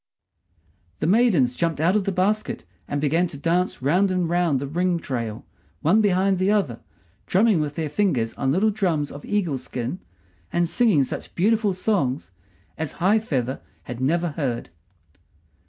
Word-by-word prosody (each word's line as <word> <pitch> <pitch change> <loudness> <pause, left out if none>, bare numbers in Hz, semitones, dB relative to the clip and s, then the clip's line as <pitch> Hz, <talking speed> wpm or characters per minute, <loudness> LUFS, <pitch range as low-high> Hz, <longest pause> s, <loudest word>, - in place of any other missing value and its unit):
The - - -1
maidens 185 - +3
jumped 165 -1 -1
out 170 +5 +3
of 205 -3 +1
the 195 - 0
basket 200 - -1 0.2
and 145 - -2
began 160 +5 +2
to 145 - -9
dance 170 0 0
round 180 +8 +3
and 180 -2 0
round 170 -5 +1
the 140 - -3
ring 175 +5 0
trail, 115 -8 -4 0.4
one 195 +8 +4
behind 190 -2 +2
the 185 +1 +2
other, 195 - +1 0.5
drumming 205 -1 +3
with 145 -1 -3
their 160 -2 -2
fingers 145 - 0
on 135 -1 -1
little 200 +8 +3
drums 175 -8 0
of 145 - -9
eagle 175 -10 0
skin, 125 +6 -5 0.5
and 175 0 +1
singing 200 - +3
such - - -6
beautiful 215 +3 +2
songs 150 - -1 0.5
as 160 -1 -3
High 195 +5 +3
feather 135 - -2 0.2
had 125 +1 -7
never 170 +6 +1
heard. 130 - -3
170 Hz, 160 wpm, -23 LUFS, 140-195 Hz, 0.5 s, one